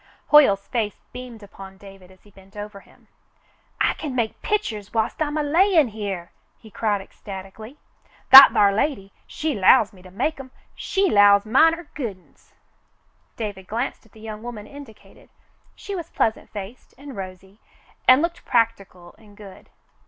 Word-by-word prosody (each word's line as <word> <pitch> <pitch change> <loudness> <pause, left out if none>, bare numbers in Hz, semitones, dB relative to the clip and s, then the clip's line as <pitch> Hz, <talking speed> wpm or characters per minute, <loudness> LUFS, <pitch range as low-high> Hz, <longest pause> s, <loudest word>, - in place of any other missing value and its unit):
Hoyle's 235 -10 +5
face 220 -4 -2 0.2
beamed 245 -3 -10
upon 195 -1 -13
David 195 -2 -15
as 185 0 -22
he 205 - -21
bent 195 +1 -19
over 205 -1 -8
him. - - -24 0.7
"I - - +2
kin 285 -5 -7
make 230 -3 -3
pi'chers 230 - -3
whilst 220 +7 -1
I'm 300 0 -1
a 305 - 0
lyin' 325 - +3
here," 200 -5 -6 0.3
he 220 - -17
cried 205 -1 -1
ecstatically. 195 +6 -11 0.5
"That 270 +1 +12
thar 200 -1 +3
lady, 200 -4 -2
she 310 -1 -3
'lows 210 +1 +4
me 185 - -17
to 185 - -14
make 275 - -3
'em. 265 -1 -10 0.2
She 390 0 -1
'lows 205 0 +5
mine're 325 +9 +3
good 230 -10 -5
uns." 185 - -29 0.8
David 205 -4 -6
glanced 235 +5 -4
at 205 - -32
the 220 - -17
young 215 -1 -8
woman 230 -3 -8
indicated. 280 -6 -15 0.5
She 405 - -8
was 345 -4 -6
pleasant 220 - -2
faced 205 +3 -10
and 275 -1 -11
rosy, 190 +1 -10 0.5
and 255 +4 +6
looked 340 0 -4
practical 195 -7 -2
and 205 -2 -20
good. 200 -3 -14
215 Hz, 160 wpm, -22 LUFS, 195-270 Hz, 0.8 s, That